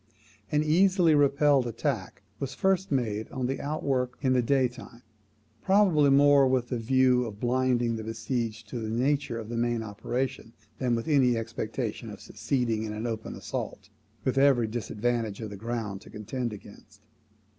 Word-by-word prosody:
An 150 Hz, 0 st, +2 dB
easily 175 Hz, +1 st, +4 dB
repelled 140 Hz, -2 st, +4 dB
attack 115 Hz, -5 st, -3 dB, 0.2 s
was 135 Hz, -1 st, -4 dB
first 190 Hz, +1 st, +1 dB
made 110 Hz, -5 st, -1 dB
on 130 Hz, -1 st, -3 dB
the 135 Hz, +2 st, -2 dB
outwork 135 Hz, -4 st, -1 dB
in 130 Hz, -1 st, +3 dB
the 125 Hz, -, +3 dB
day 130 Hz, +1 st, +2 dB
time, 120 Hz, 0 st, -13 dB, 0.6 s
probably 190 Hz, -7 st, +4 dB
more 140 Hz, 0 st, +6 dB
with 130 Hz, -2 st, 0 dB
the 125 Hz, -, -2 dB
view 125 Hz, +1 st, +3 dB
of 105 Hz, -3 st, -8 dB
blinding 120 Hz, -1 st, +1 dB
the 110 Hz, -, -5 dB
besieged 115 Hz, 0 st, -3 dB
to 120 Hz, -, -4 dB
the 110 Hz, -1 st, -4 dB
nature 130 Hz, +1 st, 0 dB
of 110 Hz, -2 st, -6 dB
the 115 Hz, +1 st, -4 dB
main 120 Hz, -1 st, 0 dB
operations 115 Hz, +3 st, -4 dB, 0.2 s
than 125 Hz, -3 st, +1 dB
with 115 Hz, -, -4 dB
any 130 Hz, -6 st, +3 dB
expectation 115 Hz, 0 st, -4 dB
of 105 Hz, -, -9 dB
succeeding 120 Hz, -5 st, -1 dB
in 110 Hz, -1 st, -4 dB
an 110 Hz, +2 st, -4 dB
open 110 Hz, -2 st, -4 dB
assault, -, -, -6 dB, 0.3 s
with 130 Hz, +1 st, +1 dB
every 135 Hz, -4 st, +4 dB
disadvantage 115 Hz, -1 st, -2 dB
of 110 Hz, -3 st, -6 dB
the -, -, -6 dB
ground 110 Hz, -2 st, -4 dB
to -, -, -14 dB
contend 120 Hz, +3 st, -4 dB
against. 105 Hz, 0 st, -13 dB
120 Hz, 165 wpm, -28 LUFS, 110-135 Hz, 0.6 s, more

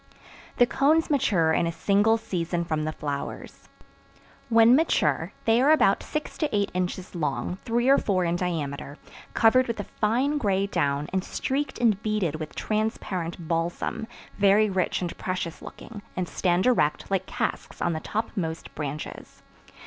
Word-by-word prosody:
The 245 Hz, -, +6 dB
cones 305 Hz, +6 st, +2 dB
mature 175 Hz, -, +2 dB
in 170 Hz, -, +2 dB
a -, -, -1 dB
single 205 Hz, +5 st, +3 dB
season 175 Hz, -5 st, -2 dB
from 155 Hz, -2 st, -1 dB
the 155 Hz, -, -1 dB
flowers. 145 Hz, -2 st, -6 dB, 0.8 s
When 230 Hz, +1 st, +6 dB
mature 320 Hz, +4 st, +1 dB
they 225 Hz, +2 st, +4 dB
are 275 Hz, -, +4 dB
about 300 Hz, -11 st, +4 dB
six 305 Hz, -1 st, -5 dB
to 305 Hz, -, +1 dB
eight 205 Hz, -1 st, 0 dB
inches 180 Hz, 0 st, -3 dB
long, 170 Hz, +2 st, -2 dB
three 240 Hz, +1 st, +1 dB
or 275 Hz, +1 st, +6 dB
four 185 Hz, -3 st, 0 dB
in 170 Hz, 0 st, 0 dB
diameter, 150 Hz, -5 st, -3 dB, 0.4 s
covered 250 Hz, +3 st, +5 dB
with 230 Hz, -2 st, -3 dB
a -, -, -2 dB
fine 250 Hz, +10 st, 0 dB
gray 195 Hz, -5 st, +1 dB
down 145 Hz, -6 st, 0 dB
and 190 Hz, -1 st, 0 dB
streaked 270 Hz, +5 st, -2 dB
and 220 Hz, -4 st, +2 dB
beaded 210 Hz, -8 st, -1 dB
with 155 Hz, -1 st, -7 dB
transparent 185 Hz, -6 st, -2 dB
balsam, 170 Hz, +6 st, -2 dB, 0.3 s
very 205 Hz, +1 st, +4 dB
rich 185 Hz, -1 st, 0 dB
and 175 Hz, -, -4 dB
precious 180 Hz, -3 st, -3 dB
looking, 215 Hz, -3 st, -10 dB, 0.2 s
and 180 Hz, -1 st, -1 dB
stand 180 Hz, +1 st, +1 dB
erect 195 Hz, -10 st, +1 dB
like 190 Hz, -1 st, 0 dB
casks -, -, -3 dB
on 170 Hz, -, 0 dB
the 160 Hz, -, -2 dB
topmost 175 Hz, -4 st, -4 dB
branches. 150 Hz, 0 st, -7 dB
190 Hz, 155 wpm, -26 LUFS, 170-225 Hz, 0.8 s, The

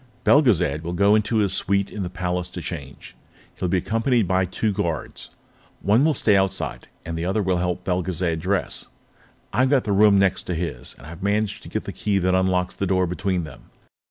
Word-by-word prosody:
Belgezad 90 Hz, -, +3 dB
will 85 Hz, +1 st, -4 dB
go 100 Hz, +3 st, +4 dB
into 110 Hz, +1 st, +2 dB
his 100 Hz, -3 st, +2 dB
suite 100 Hz, 0 st, 0 dB
in 105 Hz, -, -5 dB
the 90 Hz, -, -3 dB
Palace 90 Hz, -1 st, -2 dB
to 90 Hz, -, -7 dB
change. 70 Hz, -5 st, -8 dB, 0.4 s
He'll 90 Hz, -, -1 dB
be 95 Hz, -, +2 dB
accompanied 115 Hz, +3 st, +1 dB
by 95 Hz, 0 st, +2 dB
two 105 Hz, +4 st, -1 dB
guards. 85 Hz, -6 st, -4 dB, 0.5 s
One 105 Hz, +7 st, +4 dB
will 155 Hz, -1 st, +3 dB
stay 110 Hz, -, +2 dB
on -, -, +5 dB
the -, -, +5 dB
outside, 95 Hz, 0 st, -3 dB, 0.2 s
the 80 Hz, 0 st, -4 dB
other 95 Hz, +4 st, 0 dB
will 95 Hz, -1 st, +1 dB
help 90 Hz, 0 st, -2 dB
Belgezad 90 Hz, -2 st, -1 dB
dress. 95 Hz, +3 st, -2 dB, 0.7 s
I've 130 Hz, +5 st, +3 dB
got 135 Hz, -2 st, +3 dB
the 105 Hz, -, -2 dB
room 100 Hz, 0 st, +5 dB
next 95 Hz, -2 st, +2 dB
to 90 Hz, -, -1 dB
his, 80 Hz, -8 st, -4 dB
and 65 Hz, -, -15 dB
I've 80 Hz, +2 st, -10 dB
managed 105 Hz, +1 st, 0 dB
to -, -, -11 dB
get -, -, -3 dB
the -, -, -6 dB
key 105 Hz, -2 st, 0 dB
that 95 Hz, -1 st, +1 dB
unlocks 95 Hz, -1 st, +1 dB
the 100 Hz, -, -2 dB
door 95 Hz, 0 st, +2 dB
between 90 Hz, 0 st, -1 dB
them. 75 Hz, -, -12 dB
95 Hz, 210 wpm, -23 LUFS, 90-100 Hz, 0.7 s, on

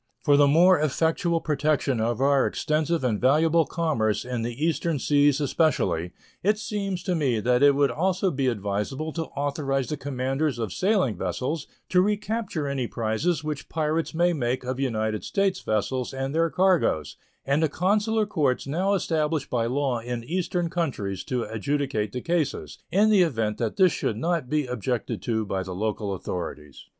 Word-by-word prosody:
For 145 Hz, -2 st, +5 dB
the 145 Hz, 0 st, +5 dB
more 175 Hz, +5 st, +5 dB
effectual 165 Hz, +3 st, +1 dB
protection 145 Hz, -4 st, 0 dB
of 115 Hz, +2 st, -1 dB
our 140 Hz, 0 st, +4 dB
extensive 155 Hz, +1 st, 0 dB
and 115 Hz, -5 st, 0 dB
valuable 160 Hz, +5 st, +4 dB
commerce 130 Hz, -12 st, 0 dB
in 125 Hz, -2 st, -3 dB
the 120 Hz, +6 st, -2 dB
Eastern 165 Hz, -1 st, 0 dB
seas 145 Hz, 0 st, +3 dB
especially, 135 Hz, -, +1 dB, 0.3 s
it 210 Hz, +3 st, +2 dB
seems 200 Hz, -4 st, -3 dB
to 185 Hz, -, -1 dB
me 135 Hz, -9 st, +1 dB
that 125 Hz, +3 st, +2 dB
it 140 Hz, -1 st, +6 dB
would 140 Hz, -2 st, +3 dB
also 185 Hz, +6 st, 0 dB
be 135 Hz, -2 st, -1 dB
advisable 115 Hz, +8 st, -2 dB
to 165 Hz, -1 st, -3 dB
authorize 140 Hz, -2 st, -2 dB
the 150 Hz, -, -2 dB
commanders 135 Hz, +1 st, -1 dB
of 110 Hz, -5 st, -3 dB
sailing 190 Hz, -, +1 dB
vessels 130 Hz, -, -3 dB, 0.2 s
to 180 Hz, -, +4 dB
recapture 210 Hz, -4 st, -1 dB
any 135 Hz, -3 st, -2 dB
prizes 120 Hz, +10 st, -1 dB
which 150 Hz, -2 st, -5 dB
pirates 160 Hz, 0 st, -1 dB
may 175 Hz, +1 st, +3 dB
make 125 Hz, -4 st, -1 dB
of 130 Hz, +1 st, -3 dB
United 110 Hz, -5 st, -1 dB
States 195 Hz, -1 st, 0 dB
vessels 125 Hz, +4 st, -2 dB
and 135 Hz, +1 st, -3 dB
their 165 Hz, +1 st, +2 dB
cargoes, 175 Hz, -, +1 dB, 0.3 s
and 140 Hz, +3 st, +1 dB
the 160 Hz, -, +2 dB
consular 210 Hz, +6 st, +1 dB
courts 145 Hz, -11 st, 0 dB
now 185 Hz, +8 st, +1 dB
established 155 Hz, -5 st, -1 dB
by 115 Hz, -2 st, +1 dB
law 130 Hz, -1 st, 0 dB
in 120 Hz, 0 st, -5 dB
Eastern 175 Hz, +4 st, -1 dB
countries 105 Hz, -, -2 dB
to 125 Hz, -2 st, -1 dB
adjudicate 110 Hz, 0 st, -2 dB
the 125 Hz, -, -4 dB
cases 145 Hz, -, -2 dB
in 210 Hz, +3 st, +3 dB
the 205 Hz, -3 st, +5 dB
event 115 Hz, -11 st, 0 dB
that 115 Hz, -3 st, -2 dB
this 185 Hz, -2 st, +5 dB
should 110 Hz, -, -2 dB
not 165 Hz, 0 st, -1 dB
be 150 Hz, 0 st, +1 dB
objected 125 Hz, -1 st, -3 dB
to 110 Hz, -2 st, -1 dB
by 95 Hz, -1 st, -2 dB
the 90 Hz, -1 st, -6 dB
local 105 Hz, 0 st, -2 dB
authorities. 75 Hz, -6 st, -6 dB
140 Hz, 170 wpm, -25 LUFS, 120-165 Hz, 0.3 s, it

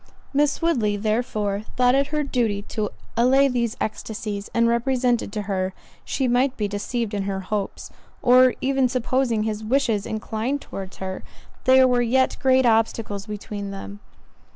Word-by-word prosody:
Miss 290 Hz, +2 st, +1 dB
Woodley, 225 Hz, -11 st, +1 dB
therefore, 215 Hz, -2 st, -1 dB, 0.2 s
thought 250 Hz, 0 st, +4 dB
it 275 Hz, +1 st, +2 dB
her 300 Hz, 0 st, -1 dB
duty 230 Hz, -7 st, 0 dB
to 210 Hz, -2 st, -2 dB, 0.3 s
allay 260 Hz, +4 st, +4 dB
these 240 Hz, -3 st, -1 dB
ecstasies, 210 Hz, -2 st, -4 dB
and 230 Hz, 0 st, +3 dB
represented 240 Hz, -1 st, +1 dB
to 210 Hz, -, -2 dB
her, 190 Hz, -2 st, -2 dB, 0.3 s
she 265 Hz, -2 st, -1 dB
might 250 Hz, +2 st, +2 dB
be 210 Hz, -, 0 dB
deceived 210 Hz, +2 st, -3 dB
in 200 Hz, -1 st, -2 dB
her 195 Hz, -1 st, -2 dB
hopes—or 245 Hz, +5 st, +1 dB
even 265 Hz, -1 st, +2 dB
supposing 255 Hz, -2 st, 0 dB
his 215 Hz, 0 st, -3 dB
wishes 225 Hz, -3 st, +1 dB
inclined 220 Hz, +5 st, -2 dB
towards 195 Hz, -7 st, -8 dB
her, 190 Hz, 0 st, -5 dB, 0.4 s
there 260 Hz, 0 st, +6 dB
were 245 Hz, -1 st, +2 dB
yet 255 Hz, +2 st, +2 dB
great 260 Hz, -1 st, +4 dB
obstacles 225 Hz, -2 st, +1 dB
between 205 Hz, -1 st, -6 dB
them. 200 Hz, +1 st, -8 dB
230 Hz, 150 wpm, -23 LUFS, 205-255 Hz, 0.4 s, there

